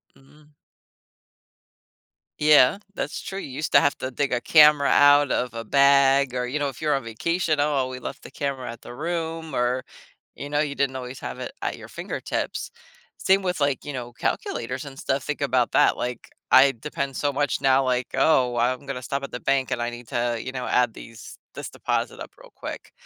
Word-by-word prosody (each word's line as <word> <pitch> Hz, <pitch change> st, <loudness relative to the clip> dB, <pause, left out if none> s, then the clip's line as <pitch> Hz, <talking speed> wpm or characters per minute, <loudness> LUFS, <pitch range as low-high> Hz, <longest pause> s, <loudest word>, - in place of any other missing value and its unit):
Mhm. 150 Hz, +2 st, -22 dB, 1.9 s
Yeah, 150 Hz, +3 st, +5 dB, 0.2 s
that's -, -, -4 dB
true, 195 Hz, -, -6 dB
you -, -, -7 dB
used 150 Hz, +3 st, -4 dB
to -, -, +9 dB
have 145 Hz, -, +1 dB
to 130 Hz, -, -3 dB
dig 140 Hz, +1 st, -1 dB
a 120 Hz, -, 0 dB
camera 150 Hz, 0 st, +6 dB
out 145 Hz, 0 st, +5 dB
of 125 Hz, -1 st, -1 dB
a 115 Hz, 0 st, -5 dB
bag, 140 Hz, +1 st, +4 dB
or, 125 Hz, -1 st, -2 dB
you 135 Hz, +4 st, -2 dB
know, 145 Hz, -1 st, -1 dB
if 135 Hz, +3 st, -11 dB
you're 150 Hz, -2 st, +2 dB
on 135 Hz, -, -3 dB
vacation, 155 Hz, +7 st, -1 dB
"Oh, 150 Hz, 0 st, +2 dB
well 130 Hz, -2 st, 0 dB
we 130 Hz, 0 st, -7 dB
left 135 Hz, -, -7 dB
the -, -, -11 dB
camera 135 Hz, -4 st, -4 dB
at 115 Hz, -, -12 dB
the -, -, -10 dB
room," 165 Hz, -1 st, -4 dB
or, 125 Hz, +1 st, 0 dB, 0.5 s
you 140 Hz, -, -7 dB
know, 145 Hz, 0 st, 0 dB
you 150 Hz, -2 st, 0 dB
didn't 135 Hz, -1 st, 0 dB
always 125 Hz, 0 st, -6 dB
have 125 Hz, -, -6 dB
it 130 Hz, -, -5 dB
at -, -, -3 dB
your -, -, -11 dB
fingertips. -, -, -4 dB, 0.5 s
Same 195 Hz, +1 st, +2 dB
with, 180 Hz, -2 st, -1 dB
like, 140 Hz, -2 st, 0 dB
you 145 Hz, -, -5 dB
know, 120 Hz, -2 st, -6 dB
calculators 145 Hz, -, -3 dB
and 135 Hz, -1 st, -10 dB
stuff. 135 Hz, -1 st, -1 dB
Think 150 Hz, -1 st, -4 dB
about 130 Hz, -3 st, +1 dB
that, -, -, +4 dB
like, 125 Hz, -1 st, -5 dB, 0.2 s
I 135 Hz, +1 st, +7 dB
depend 140 Hz, +2 st, -5 dB
so 145 Hz, -1 st, 0 dB
much 140 Hz, -2 st, -1 dB
now, 135 Hz, 0 st, +4 dB
like, 125 Hz, -1 st, 0 dB
"Oh, 125 Hz, -6 st, +3 dB
I'm 125 Hz, +4 st, 0 dB
gonna 130 Hz, -2 st, -4 dB
stop 140 Hz, +2 st, -3 dB
at -, -, -6 dB
the 125 Hz, -, -5 dB
bank, 135 Hz, -1 st, 0 dB
and 120 Hz, -, -1 dB
I 120 Hz, -, -1 dB
need 120 Hz, -1 st, -10 dB
to," 120 Hz, -1 st, -1 dB
you 130 Hz, -, -5 dB
know, 125 Hz, -1 st, -5 dB
"add 125 Hz, -2 st, +2 dB
these 115 Hz, 0 st, -11 dB, 0.2 s
this -, -, -7 dB
deposit -, -, -2 dB
up -, -, -8 dB
real -, -, -16 dB
quick." -, -, -8 dB
135 Hz, 210 wpm, -24 LUFS, 125-145 Hz, 1.9 s, to